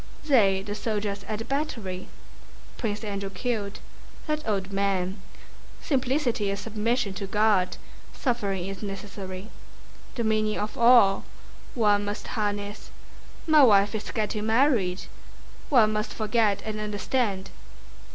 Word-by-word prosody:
"They, 200 -10 +4
the 205 +1 -4
soldiers 205 -2 -2
at 215 - -3
the 225 - -6
battery, 230 -10 -3 0.7
Prince 215 -2 -3
Andrew 200 -2 -3
killed... 200 0 -3 0.5
that 305 -1 -1
old 195 -2 -1
man... 195 -1 0 0.6
Simplicity 255 -6 0
is 200 +1 -2
submission 220 0 -1
to 195 0 -5
God. 205 -2 +2 0.3
Suffering 200 -8 -1
is 195 0 -6
necessary... 195 -1 -7 0.6
the 235 - -1
meaning 215 -1 +1
of 210 0 -3
all... 235 -5 +6 0.5
one 205 -3 +3
must 205 +1 -5
harness... 205 -2 -3 0.6
my 310 -2 +6
wife 205 -5 +6
is 215 -1 -4
getting 215 0 -2
married... 220 -7 +2 0.7
One 225 -6 +5
must 215 0 -2
forget 215 -2 +1
and 215 -1 -3
understand..." 205 -1 -1
210 Hz, 120 wpm, -26 LUFS, 200-230 Hz, 0.7 s, all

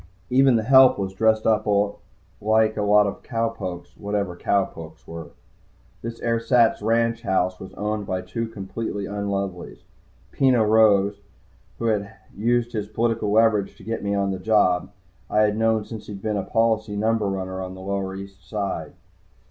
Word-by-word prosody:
Even 130 0 +5
the 110 - +1
help 130 +2 +6
was 95 -1 -3
dressed 110 +2 +2
up 110 -1 +2 0.7
like 110 +1 +3
a 105 - -2
lot 105 0 +5
of 100 - -4
cow 115 -1 -1
pokes, 95 -6 -7
whatever 100 -3 -3
cow 100 +2 +1
pokes 80 -1 -12
were. 80 -1 -7 0.7
This 115 0 -6
ersatz 115 0 +2
ranch 115 +1 +1
house 95 -3 0
was 95 - -10
owned 105 0 -3
by 95 0 -2
two 115 +6 -4
completely 105 0 -5
unlovelies. 100 -3 -4 0.5
Peno 130 -4 +3
Rose, 105 -2 +4 0.6
who 115 - -4
had 105 -1 -1 0.2
used 120 +3 0
his 105 -2 -3
political 110 -1 -1
leverage 110 -2 +2
to - - -15
get 115 +1 -4
me 100 0 0
on 100 -1 0
the 95 - -4
job, 90 -3 +2 0.4
I 105 - +3
had 105 -1 +2
known 110 -1 +1
since 110 -2 -9
he'd 100 -2 -7
been 110 -1 -1
a - - 0
policy 110 -1 0
number 110 0 +1
runner 95 -1 -3
on 95 0 -6
the 95 - -10
lower 95 0 -3
East 95 -1 -10
Side. 95 -7 -3
105 Hz, 170 wpm, -23 LUFS, 95-115 Hz, 0.7 s, help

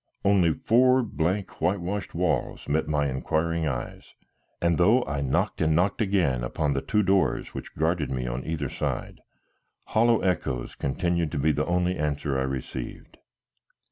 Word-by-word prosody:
Only 95 -4 +4
four 125 +2 +4
blank, 95 -1 -2
whitewashed 95 +1 -1
walls 80 -6 -1
met 75 +2 0
my 75 -2 +1
inquiring 80 +5 -1
eyes, 65 -4 -5 0.4
and 85 -1 +1
though 110 +8 +4
I 75 -1 -2
knocked 65 -2 0
and 80 0 +3
knocked 95 +7 +1
again 90 - +1
upon 70 +4 -1
the 70 - -1
two 105 +9 +1
doors 95 -1 +1
which - - -8
guarded 80 -2 0
me 65 -1 -2
on - - -3
either 75 -3 -2
side, - - -4 0.7
hollow 115 +1 +3
echoes 70 -9 -1
continued 85 +3 -1
to - - -1
be 75 +3 +3
the 75 +1 -1
only 90 +1 +1
answer 70 -2 -1
I 65 - 0
received. 65 -2 -6
80 Hz, 155 wpm, -26 LUFS, 70-95 Hz, 0.7 s, Only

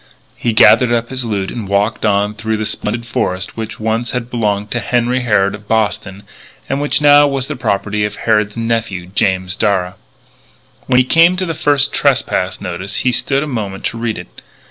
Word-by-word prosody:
He 120 - -1
gathered 120 +2 +5
up 120 0 -1
his 130 -2 -2
loot 100 -4 -2
and 115 -5 -6
walked 100 +3 0
on 105 0 +1
through 110 0 -3
the 110 - -3
splendid 115 +3 -2
forest 95 -6 -2
which 110 0 -6
once 110 +2 -1
had 125 -1 -4
belonged 105 -3 -1
to 120 - -1
Henry 120 +3 0
Harrod 105 -5 +2
of 100 0 -10
Boston, 105 -2 -1 0.4
and 135 +1 -2
which 145 +1 +1
now 145 0 +6
was 135 -2 -1
the 150 - -4
property 105 -3 -1
of 105 0 -2
Harrod's 105 -1 0
nephew, 115 -6 -2
James 95 -1 0
Darragh. 90 -3 0 0.9
When 125 - +3
he 130 - +4
came 165 +6 +4
to 185 - -1
the 165 - -3
first 145 -2 +1
trespass 130 -9 0
notice 95 +1 -4
he 125 - +4
stood 135 +3 +1
a - - -5
moment 105 -7 -4
to 115 - -2
read 115 -2 -2
it. - - -11
110 Hz, 190 wpm, -16 LUFS, 100-125 Hz, 0.9 s, now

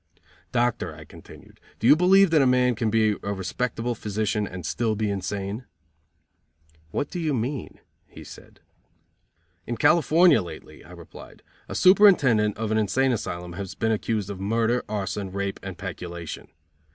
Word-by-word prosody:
"Doctor," 120 -1 -1
I - - -12
continued, - - -15 0.2
"do - - -5
you 140 +5 +8
believe 185 +2 +5
that 155 -3 +5
a 135 - +4
man 125 0 +3
can 115 -1 -1
be 110 -1 +2
a 100 - -3
respectable 115 +5 -3
physician 105 -1 -2
and 90 -1 -8
still 110 -2 -1
be 105 -1 -1
insane?" 100 +4 -4 1.2
"What 145 - -3
do 180 - -4
you 155 -4 0
mean?" 125 +3 -4 0.3
he - - -13
said. - - -14 1.1
"In 120 - -3
California 170 -1 +4
lately," 85 -4 -11
I - - -17
replied, - - -13 0.3
"A - - -5
superintendent 150 - +5
of 110 0 -3
an 110 - +2
insane 130 +6 +1
asylum 90 -6 -4
has 95 +1 -7
been 110 - 0
accused 105 -2 -2
of 95 - -7
murder, 115 +4 0
arson, 100 -2 -3
rape 100 0 -3
and 95 -3 -7
peculation. 85 -3 -7
110 Hz, 155 wpm, -25 LUFS, 100-125 Hz, 1.2 s, you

